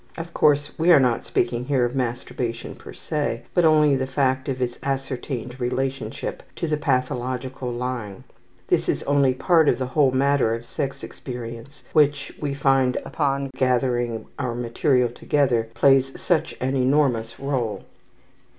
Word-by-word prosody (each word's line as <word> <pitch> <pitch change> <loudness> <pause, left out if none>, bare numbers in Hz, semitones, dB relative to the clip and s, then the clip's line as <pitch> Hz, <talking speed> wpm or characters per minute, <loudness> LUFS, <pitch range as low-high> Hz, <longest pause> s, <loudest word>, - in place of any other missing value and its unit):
Of 170 0 -7
course 145 -1 +3
we 170 +2 +4
are 165 - +8
not 125 -3 +1
speaking 120 0 -1
here 130 -3 +2
of 120 - -3
masturbation 120 -1 -3
per - - -12
se, 145 -6 -3
but 175 -2 +3
only 155 -2 +5
of 135 - +1
the 130 - -1
fact 130 0 0
of 130 -1 -2
its 120 -1 -2
ascertained 130 -2 -4
relationship 130 +2 -3
to - - -3
the 155 - +1
pathological 130 -2 -2
lying. 120 -5 -4 0.4
This - - +1
is - - 0
only 140 -2 +2
part 160 +1 +4
of 120 - +2
the 130 - -2
whole 135 +2 +3
matter 130 -3 +2
of 115 +1 -8
sex 135 +3 -4
experience 120 +2 -8
which, 145 -2 +2
we 140 -2 -2
find 135 -2 +2
upon 140 -3 -1
gathering 120 -3 0
our 125 -3 -2
material 120 +1 +1
together, 120 -2 0
plays 135 +1 +3
such 175 -4 0
an 130 +2 -1
enormous 130 -4 +1
role. 125 -7 -2
130 Hz, 155 wpm, -23 LUFS, 120-140 Hz, 0.4 s, are